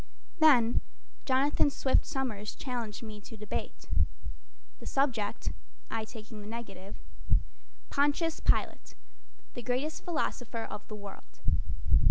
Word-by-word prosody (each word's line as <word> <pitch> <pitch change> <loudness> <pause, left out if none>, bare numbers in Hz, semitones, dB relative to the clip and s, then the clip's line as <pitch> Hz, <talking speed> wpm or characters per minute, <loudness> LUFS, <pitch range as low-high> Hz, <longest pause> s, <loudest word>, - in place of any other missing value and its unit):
Then 250 -7 +7 0.4
Jonathan 275 +2 +4
Swift 270 -1 +3
Somers 220 -6 -2
challenged 240 -5 -3
me 215 -2 -7
to 225 - -10
debate 210 -1 -4 0.9
The - - -7
subject, 240 -7 +1 0.4
(I 225 -1 -1
taking 215 -1 -9
the 205 - -8
negative): 200 -4 -6 0.9
"Pontius 295 +3 +2
Pilate, - - +2 0.6
the 245 - -5
Greatest 255 +6 -1
Philosopher 245 -8 -1
of 210 -1 -6
the 215 - -6
World." 200 -1 -10
235 Hz, 110 wpm, -32 LUFS, 210-270 Hz, 0.9 s, Then